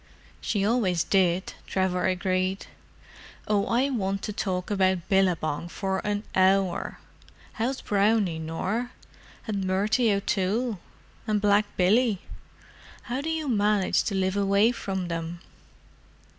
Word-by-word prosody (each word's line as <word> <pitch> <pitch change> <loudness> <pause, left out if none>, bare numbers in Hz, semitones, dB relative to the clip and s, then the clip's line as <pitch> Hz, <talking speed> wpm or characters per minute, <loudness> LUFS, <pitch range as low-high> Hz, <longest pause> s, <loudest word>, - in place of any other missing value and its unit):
"She 200 -2 0
always 200 -7 +2
did," 185 -1 +1
Trevor 185 -1 0
agreed. 185 +1 -1 0.8
"Oh, 205 -1 +1
I 260 +4 +1
want 195 -5 -2
to 210 - -3
talk 185 -2 -2
about 190 -3 +1
Billabong 175 -4 +1
for 190 0 -2
an 205 +1 -2
hour! 190 -1 +2 0.6
How's 250 +4 -2
Brownie, 200 -4 +1
Nor? 190 +10 -3 0.5
and 200 -3 -2
Murty 210 +5 +2
O'Toole? 200 +3 0 0.5
and 210 -1 +1
Black 205 0 +3
Billy? 210 +3 +3 0.8
How 250 +3 -3
do 315 - -3
you 320 -2 -2
manage 210 -4 +2
to 200 - -1
live 190 0 0
away 200 +3 +3
from 190 -6 -4
them?" 165 0 -4
195 Hz, 120 wpm, -26 LUFS, 185-215 Hz, 0.8 s, Black